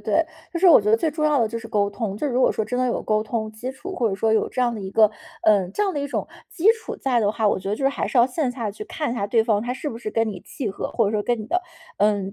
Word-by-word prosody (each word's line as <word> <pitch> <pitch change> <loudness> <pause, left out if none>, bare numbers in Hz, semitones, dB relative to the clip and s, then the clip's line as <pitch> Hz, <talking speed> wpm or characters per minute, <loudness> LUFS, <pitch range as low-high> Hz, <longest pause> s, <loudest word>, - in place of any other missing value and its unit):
对， 330 - +1 0.3
就 340 - -3
是 380 - +5
我 335 - +8
觉 210 +1 0
得 220 - +6
最 315 +7 0
重 305 +1 -2
要 300 -3 +3
的 225 - +2
就 230 +1 -4
是 225 - -9
沟 205 -2 +1
通， 200 -1 -4
就 295 - -2
是 275 - -2
如 250 - +1
果 - - +4
说 220 - -1
真 245 +4 -3
的 255 - +2
有 240 - -1
沟 215 0 +1
通 220 -1 -3
基 220 +4 -6
础， 375 +8 -8
或 235 - +1
者 195 - -2
说 220 +3 +1
有 220 - +2
这 - - -3
样 240 -2 +2
的 215 - -6
一 190 -1 -6
个， 215 +1 +5 0.3
呃， 200 -4 +4
这 210 - -1
样 395 -2 +1
的 295 - -3
一 285 - -2
种 285 - -3 0.2
基 360 +1 -2
础 455 0 -7
在 255 -3 +1
的 205 -3 +2
话， 220 -1 +1
我 - - +1
觉 190 - -6
得 205 - +1
就 255 - -7
是 - - +5
还 275 - -2
是 260 - 0
要 240 - +6
线 265 +1 -1
下 230 -5 -3
去 215 +1 -8
看 300 +2 -3
一 - - -2
下 200 -4 -2
对 225 +2 +3
方 215 -2 +1
他 245 - -2
是 265 +4 -4
不 230 - -6
是 225 -2 -5
跟 225 0 +1
你 195 -4 -6
契 255 -7 -5
合， 195 - -5
或 230 - +2
者 205 - -1
说 210 - 0
跟 240 +2 0
你 215 - -7
的， 360 +9 +1 0.4
呃， 205 0 +3
230 Hz, 375 characters per minute, -23 LUFS, 215-265 Hz, 0.4 s, 我